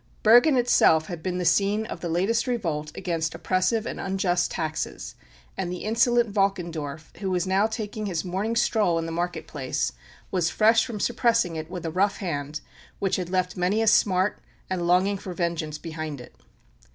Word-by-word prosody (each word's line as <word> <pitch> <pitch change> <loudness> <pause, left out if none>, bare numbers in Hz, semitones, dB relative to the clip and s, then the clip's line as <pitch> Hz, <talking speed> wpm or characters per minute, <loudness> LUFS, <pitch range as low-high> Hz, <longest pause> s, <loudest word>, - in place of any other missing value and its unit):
Bergen 245 +6 +6
itself 200 -10 +4
had 175 -3 -5
been 180 +1 -2
the 180 - -2
scene 200 +5 +2
of - - -6
the 170 - -4
latest 200 +8 +1
revolt 165 -11 -2
against 165 -2 -2
oppressive 190 +4 0
and - - -5
unjust 190 -2 0
taxes, 155 -1 -4 0.4
and 180 -2 -3
the 180 - -5
insolent 235 0 +2
Valkendorf, 170 -7 -2
who 195 -1 -3
was 180 -1 0
now 190 +3 +2
taking 215 -1 -4
his 175 -2 -2
morning 195 +6 -2
stroll 215 -7 +2
in 165 - -2
the 165 - -4
market 170 -1 -3
place, 130 - -2 0.4
was 175 -3 +1
fresh 225 +4 +4
from 225 -4 -5
suppressing 230 -7 +1
it 155 0 -5
with 180 -2 -6
a 165 - -2
rough 195 +4 +1
hand 150 -4 -4 0.4
which 195 -2 0
had 180 -2 -4
left 180 -1 0
many 185 +4 +1
a 225 - +2
smart 190 -2 +3 0.3
and 175 -2 -1
longing 190 +3 +3
for 185 -2 -7
vengeance 165 -3 -2
behind 155 -3 -6
it. 125 - -12
180 Hz, 180 wpm, -25 LUFS, 165-210 Hz, 0.4 s, Bergen